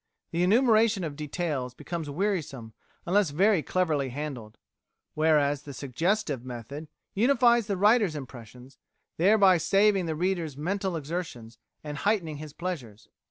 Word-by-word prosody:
The 170 Hz, -, -1 dB
enumeration 220 Hz, 0 st, +3 dB
of 155 Hz, -3 st, -4 dB
details 150 Hz, -4 st, -3 dB
becomes 165 Hz, -1 st, -5 dB
wearisome 145 Hz, -, -3 dB, 0.3 s
unless 195 Hz, 0 st, +2 dB
very 190 Hz, +5 st, +3 dB
cleverly 155 Hz, -6 st, 0 dB
handled, 125 Hz, -5 st, -6 dB, 0.6 s
whereas 150 Hz, -2 st, +2 dB
the 140 Hz, -2 st, -10 dB
suggestive 150 Hz, -, -1 dB
method 130 Hz, +5 st, -8 dB, 0.3 s
unifies 240 Hz, 0 st, +3 dB
the 200 Hz, -2 st, -1 dB
writer's 205 Hz, -3 st, +3 dB
impressions, 125 Hz, -1 st, -11 dB, 0.4 s
thereby 190 Hz, 0 st, +5 dB
saving 195 Hz, +2 st, +3 dB
the 160 Hz, -, -2 dB
reader's 170 Hz, -4 st, -2 dB
mental 190 Hz, +4 st, -2 dB
exertions 145 Hz, -8 st, -6 dB, 0.2 s
and 145 Hz, -1 st, -6 dB
heightening 180 Hz, -7 st, 0 dB
his 155 Hz, 0 st, -8 dB
pleasures. 140 Hz, -, -6 dB
160 Hz, 125 wpm, -27 LUFS, 140-195 Hz, 0.6 s, thereby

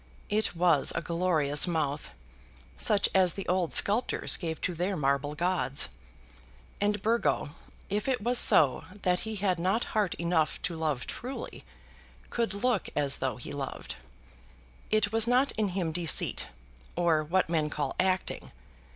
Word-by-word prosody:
It 215 Hz, -3 st, 0 dB
was 165 Hz, -5 st, +3 dB
a -, -, -1 dB
glorious 160 Hz, -3 st, +1 dB
mouth, 155 Hz, -4 st, -2 dB, 0.7 s
such 205 Hz, -2 st, +2 dB
as 185 Hz, -3 st, +4 dB
the 195 Hz, -, -5 dB
old 180 Hz, -2 st, +1 dB
sculptors 215 Hz, +5 st, +2 dB
gave 160 Hz, -3 st, -4 dB
to 180 Hz, -, -1 dB
their 180 Hz, +3 st, -2 dB
marble 140 Hz, +1 st, 0 dB
gods! 175 Hz, -5 st, 0 dB, 0.9 s
And 205 Hz, 0 st, +1 dB
Burgo, 230 Hz, -8 st, +1 dB, 0.4 s
if 210 Hz, +4 st, -2 dB
it 260 Hz, -2 st, +1 dB
was 240 Hz, +3 st, +2 dB
so 135 Hz, -5 st, +5 dB, 0.2 s
that 180 Hz, -1 st, +2 dB
he 220 Hz, -, -4 dB
had 190 Hz, -3 st, 0 dB
not 190 Hz, +7 st, +1 dB
heart 210 Hz, -5 st, +1 dB
enough 170 Hz, -2 st, 0 dB
to 175 Hz, -, -2 dB
love 155 Hz, -6 st, -2 dB
truly, 255 Hz, +3 st, -6 dB, 0.7 s
could 230 Hz, -3 st, -1 dB
look 250 Hz, +5 st, 0 dB
as 140 Hz, -2 st, +2 dB
though 130 Hz, -3 st, -2 dB
he 120 Hz, -, -8 dB
loved. 140 Hz, -2 st, -6 dB, 0.9 s
It 215 Hz, -1 st, +2 dB
was 225 Hz, 0 st, +1 dB
not 255 Hz, +3 st, +3 dB
in 215 Hz, -1 st, -1 dB
him 180 Hz, -3 st, -2 dB
deceit, 165 Hz, -1 st, +1 dB, 0.5 s
or 170 Hz, -3 st, +2 dB
what 180 Hz, +5 st, +1 dB
men 160 Hz, -2 st, 0 dB
call 145 Hz, -3 st, -3 dB
acting. 185 Hz, 0 st, -1 dB
180 Hz, 150 wpm, -29 LUFS, 155-205 Hz, 0.9 s, so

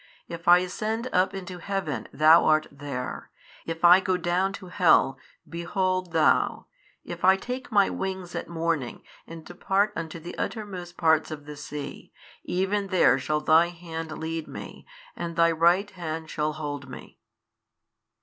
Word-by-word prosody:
if 170 Hz, 0 st, -8 dB
I 175 Hz, 0 st, +9 dB
ascend 220 Hz, +6 st, -3 dB
up 185 Hz, +2 st, +2 dB
into 185 Hz, -1 st, -7 dB
heaven, 195 Hz, -6 st, -3 dB
THOU 155 Hz, +4 st, +6 dB
art 155 Hz, 0 st, +3 dB
there, 140 Hz, -3 st, -6 dB, 0.4 s
if 165 Hz, +1 st, -1 dB
I 175 Hz, +2 st, +9 dB
go 185 Hz, -1 st, 0 dB
down 180 Hz, +2 st, 0 dB
to 195 Hz, -2 st, -9 dB
hell, 165 Hz, -8 st, +3 dB, 0.3 s
behold 185 Hz, +1 st, -2 dB
Thou, 155 Hz, -, +2 dB, 0.4 s
if 175 Hz, -1 st, -8 dB
I 190 Hz, +1 st, +6 dB
take 250 Hz, +5 st, -6 dB
my 200 Hz, -2 st, +4 dB
wings 190 Hz, -2 st, -4 dB
at -, -, -5 dB
morning 165 Hz, -6 st, -2 dB, 0.2 s
and 165 Hz, -1 st, -10 dB
depart 195 Hz, +4 st, 0 dB
unto 165 Hz, -1 st, -5 dB
the 170 Hz, +2 st, -8 dB
uttermost 185 Hz, -5 st, -5 dB
parts 160 Hz, -1 st, +3 dB
of 145 Hz, -2 st, -8 dB
the 150 Hz, 0 st, -8 dB
sea, 145 Hz, 0 st, -8 dB, 0.3 s
even 195 Hz, +2 st, -1 dB
there 175 Hz, -9 st, +4 dB
shall 150 Hz, +3 st, -1 dB
Thy 160 Hz, +3 st, +5 dB
Hand 165 Hz, -2 st, -7 dB
lead 160 Hz, 0 st, -4 dB
me -, -, -10 dB, 0.3 s
and 170 Hz, -1 st, -5 dB
Thy 165 Hz, 0 st, +4 dB
Right 175 Hz, +5 st, +3 dB
Hand 160 Hz, -3 st, -6 dB
shall 150 Hz, 0 st, -1 dB
hold 145 Hz, -3 st, -6 dB
me. 125 Hz, -, -11 dB
170 Hz, 155 wpm, -26 LUFS, 155-185 Hz, 0.4 s, I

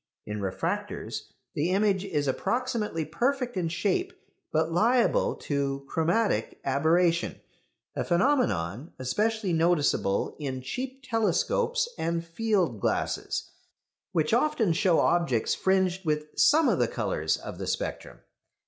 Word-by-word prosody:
In 105 Hz, 0 st, -4 dB
refractors 95 Hz, -2 st, -3 dB, 0.2 s
the 155 Hz, +4 st, 0 dB
image 195 Hz, 0 st, +2 dB
is 150 Hz, -8 st, -1 dB
approximately 215 Hz, -, -1 dB
perfect 250 Hz, -, -1 dB
in 175 Hz, -3 st, -1 dB
shape, 200 Hz, -, 0 dB, 0.4 s
but 160 Hz, +1 st, +1 dB
liable 230 Hz, +8 st, +3 dB
to 140 Hz, -1 st, -2 dB
"chromatic 165 Hz, -, 0 dB
aberration," 165 Hz, +5 st, +2 dB, 0.6 s
a -, -, -1 dB
phenomenon 170 Hz, -, +1 dB
especially 205 Hz, -, 0 dB
noticeable 160 Hz, -, +1 dB
in 130 Hz, -3 st, -4 dB
cheap 260 Hz, -, -5 dB
telescopes 455 Hz, -, +1 dB
and 170 Hz, 0 st, -1 dB
field 175 Hz, -, 0 dB
glasses, -, -, -2 dB, 0.6 s
which 165 Hz, +1 st, +1 dB
often 240 Hz, -, +2 dB
show 170 Hz, 0 st, +3 dB
objects 170 Hz, -10 st, +2 dB
fringed 190 Hz, -1 st, +1 dB
with 150 Hz, -2 st, -1 dB
some 315 Hz, +1 st, +5 dB
of -, -, +2 dB
the -, -, +3 dB
colours -, -, -1 dB
of -, -, -8 dB
the -, -, -4 dB
spectrum. -, -, -4 dB
175 Hz, 120 wpm, -27 LUFS, 150-225 Hz, 0.6 s, some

